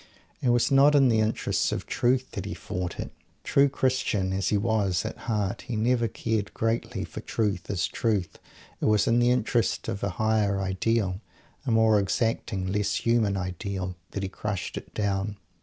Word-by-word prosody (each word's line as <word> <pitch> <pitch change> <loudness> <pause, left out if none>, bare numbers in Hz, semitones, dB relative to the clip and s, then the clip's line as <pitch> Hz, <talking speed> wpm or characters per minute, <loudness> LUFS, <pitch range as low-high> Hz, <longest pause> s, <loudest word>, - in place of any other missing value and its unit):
It 125 - +1
was 120 +1 +3
not 140 +2 +6
in 135 -3 +6
the 110 -1 +3
interests 110 +1 0
of - - -3
Truth 125 +1 +1
that - - -5
he - - -4
fought 90 -1 -5
it. - - -4 0.3
True 140 0 +4
Christian, 130 -8 0
as 95 0 0
he 105 - +2
was, 100 -4 +1
at - - -4
heart, 105 -3 -1
he 120 - -3
never 115 +2 +2
cared 110 -3 -2
greatly 115 +1 -1
for - - -8
Truth 100 -5 -2
as 100 -3 0
Truth. 105 -6 -1 0.4
It - - 0
was 105 -1 +4
in 115 +1 +3
the 120 0 +4
interest 120 -1 +1
of 100 - -3
a 100 - +1
Higher 110 -3 +2
Ideal, 95 +1 0 0.5
a - - +2
more 110 -1 +5
exacting, 100 -1 -1
less 100 +1 0
human 115 -4 +2
Ideal, 95 0 -4
that 100 - -4
he 95 - -2
crushed 100 -1 -4
it - - -7
down. 100 0 -1
105 Hz, 180 wpm, -27 LUFS, 95-115 Hz, 0.5 s, not